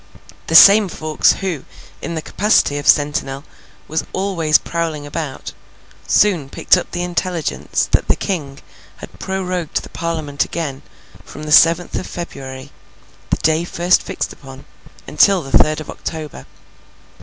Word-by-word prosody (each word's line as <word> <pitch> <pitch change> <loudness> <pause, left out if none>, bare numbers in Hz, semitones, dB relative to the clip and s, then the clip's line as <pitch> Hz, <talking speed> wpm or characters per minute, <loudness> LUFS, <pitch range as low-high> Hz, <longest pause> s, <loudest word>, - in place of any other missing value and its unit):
The 165 - -1
same 200 +3 +8
Fawkes, 155 -1 +1
who, 180 -8 -3 0.4
in 170 - -5
the 160 - -4
capacity 190 -8 +1
of 145 - -6
sentinel, 145 -2 +1 0.4
was 160 +1 -2
always 180 -5 +2
prowling 165 -3 -4
about, 145 -2 -6 0.5
soon 175 -10 +2
picked - - +3
up 180 - -3
the 175 0 -4
intelligence 175 -2 -2
that - - +2
the - - +3
King 145 -8 -4 0.4
had - - -12
prorogued 185 -3 -3
the - - -11
Parliament 160 -4 -2
again, 145 -6 -5 0.4
from 150 - -11
the 155 - -5
seventh 165 +3 +5
of - - -7
February, 135 -6 -8 0.6
the - - +1
day 160 +1 +2
first 175 +1 +1
fixed - - -4
upon, 135 -1 -13 0.4
until 195 -4 +3
the 135 -1 -1
third 155 0 +4
of 155 - -8
October. 155 - -7
160 Hz, 145 wpm, -18 LUFS, 145-175 Hz, 0.6 s, same